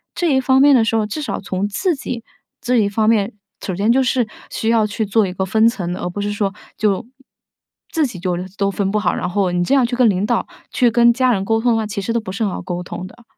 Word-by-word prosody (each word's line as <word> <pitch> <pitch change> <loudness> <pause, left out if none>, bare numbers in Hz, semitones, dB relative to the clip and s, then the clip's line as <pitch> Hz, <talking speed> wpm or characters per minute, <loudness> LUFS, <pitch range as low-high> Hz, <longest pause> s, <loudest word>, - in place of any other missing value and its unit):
这 335 -6 +1
一 265 - +3
方 265 0 +3
面 285 0 +7
的 235 - +4
时 225 - 0
候， 215 - +1
至 210 +9 -5
少 290 - -3
从 195 0 -2
自 350 - 0
己 245 -4 -5 0.4
这 250 +1 0
一 215 -3 +3
方 215 +1 +1
面， 210 -3 +2 0.3
首 190 - -3
先 205 +5 +2
就 265 +2 +3
是 245 -2 +1 0.2
需 225 - -1
要 225 -2 +3
去 215 +1 -2
做 210 +1 +3
一 180 - -5
个 190 - -2
分 220 +4 +3
层 185 -7 -4
的， - - -6
而 - - -2
不 205 +3 -5
是 205 0 -2
说 200 -1 -1 0.2
就 205 -2 0 0.9
自 320 -3 +1
己 195 -7 -9
就 180 0 -1 0.2
都 200 0 +2
分 195 0 -1
不 210 - +1
好， 210 - +1
然 - - -2
后 190 -1 0
你 175 0 0
这 175 - 0
样 270 - +4
去 245 +1 -2
跟 250 -1 +4
领 190 -1 0
导、 - - 0 0.2
去 245 -3 +3
跟 235 0 +5
家 255 +1 +2
人 195 -3 -1
沟 225 +2 +1
通 245 +1 +2
的 - - +1
话， 220 -1 -1
其 210 0 -4
实 230 +4 -2
都 235 - +1
不 215 -4 -7
是 210 +4 -2
很 205 - 0
好 - - -5
沟 180 -1 -4
通 180 +1 -7
的。 235 +5 -17
215 Hz, 305 characters per minute, -19 LUFS, 195-240 Hz, 0.9 s, 面